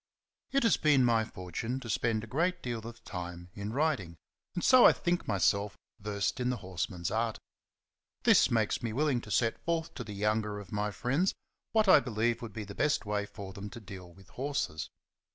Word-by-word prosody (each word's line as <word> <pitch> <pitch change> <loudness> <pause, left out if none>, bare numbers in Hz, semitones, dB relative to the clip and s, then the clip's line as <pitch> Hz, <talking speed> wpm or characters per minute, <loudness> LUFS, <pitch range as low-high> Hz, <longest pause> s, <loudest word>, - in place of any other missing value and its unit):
TT 275 -1 +2
has 230 - +4
been 145 -5 +4
my 115 -2 +3
fortune 110 +5 -4
to 130 - -9
spend 110 0 0
a - - -5
great 170 +10 0
deal 120 -2 -2
of 115 0 -11
time 90 -1 -7
in 100 +1 -5
riding, 125 - 0 0.4
and 175 - -2
so 255 -2 +7
I - - +9
think 175 0 -1
myself 100 0 +1 0.2
versed 100 +2 -2
in 125 0 0
the 125 - -1
horseman's 90 -1 -3
art. 115 0 0 0.9
This - - +6
makes 110 -3 +1
me 115 -3 -3
willing 140 -1 +1
to 110 - -11
set 115 +1 +1
forth 165 -1 -1
to 120 - -5
the 105 -2 -8
younger 105 0 0
of 100 - -11
my 105 0 -1
friends 135 - 0 0.4
what 220 -2 +3
I 185 - +9
believe 115 -2 0
would 115 -2 -6
be 105 +2 -5
the 100 0 -9
best 145 +4 +1
way 105 0 -1
for 95 -2 -9
them 100 +2 -7
to 120 - -9
deal 95 -4 -10
with 95 +2 -18
horses. 130 - -3
110 Hz, 200 wpm, -31 LUFS, 100-130 Hz, 0.9 s, I